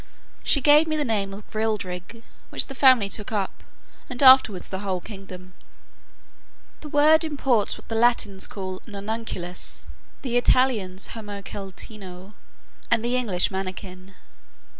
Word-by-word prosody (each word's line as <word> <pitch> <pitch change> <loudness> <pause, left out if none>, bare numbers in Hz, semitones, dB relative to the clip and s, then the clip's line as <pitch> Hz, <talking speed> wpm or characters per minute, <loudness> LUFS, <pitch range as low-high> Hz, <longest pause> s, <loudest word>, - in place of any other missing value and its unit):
She 280 - +3
gave 300 +3 +6
me 310 - -1
the 295 - 0
name 205 -4 -1
of 200 +1 -10
Grildrig, 215 -1 -3 0.3
which - - +2
the 270 - -8
family 260 -6 +5
took 205 +2 -3
up, 200 -3 -3 0.5
and 250 +1 -2
afterwards 260 -8 +7
the 190 - -4
whole 190 -2 -2
kingdom. 185 -2 -10 1.3
The 300 - -9
word 305 +3 +5
imports 270 -8 +1
what - - -16
the - - -5
Latins 225 -4 +1
call 185 -2 -6
nanunculus, 200 -4 -5 0.4
the 245 -3 0
Italians 220 -7 +1
homunceletino, 200 -2 -9 0.6
and 230 - +2
the 245 +1 0
English 205 -9 +1
mannikin. 185 0 -7
210 Hz, 130 wpm, -24 LUFS, 190-245 Hz, 1.3 s, afterwards